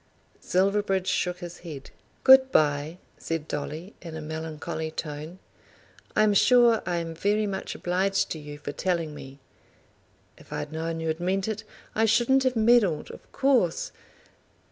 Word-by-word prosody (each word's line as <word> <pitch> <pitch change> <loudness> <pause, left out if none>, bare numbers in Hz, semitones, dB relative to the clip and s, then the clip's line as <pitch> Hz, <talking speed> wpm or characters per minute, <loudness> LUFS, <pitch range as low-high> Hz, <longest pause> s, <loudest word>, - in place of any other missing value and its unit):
Silverbridge 195 0 +1
shook 180 -1 -1
his 175 0 -8
head. 150 -6 -9 0.3
"Good 265 0 +8
bye," 150 +2 +2 0.2
said 165 -2 -3
Dolly 155 +6 -5
in 165 -3 -8
a - - -5
melancholy 160 0 -5
tone; 155 +2 -6 0.8
"I - - +5
am 210 -1 +4
sure 235 +1 +5
I 175 - 0
am 165 -1 -3
very 205 +6 +1
much 195 -2 -4
obliged 190 +2 0
to 160 - -3
you 145 0 -9
for 145 - -6
telling 165 0 -1
me. 135 -2 -10 1.0
If - - -18
I'd - - -4
known 165 +1 -3
you'd 160 0 -2
meant 185 +3 0
it, 220 0 -3 0.3
I 220 - +2
shouldn't 240 +5 +3
have 255 -1 +2
meddled, 220 -7 +3
of - - -14
course. 255 -11 +1
175 Hz, 150 wpm, -26 LUFS, 160-210 Hz, 1.0 s, Good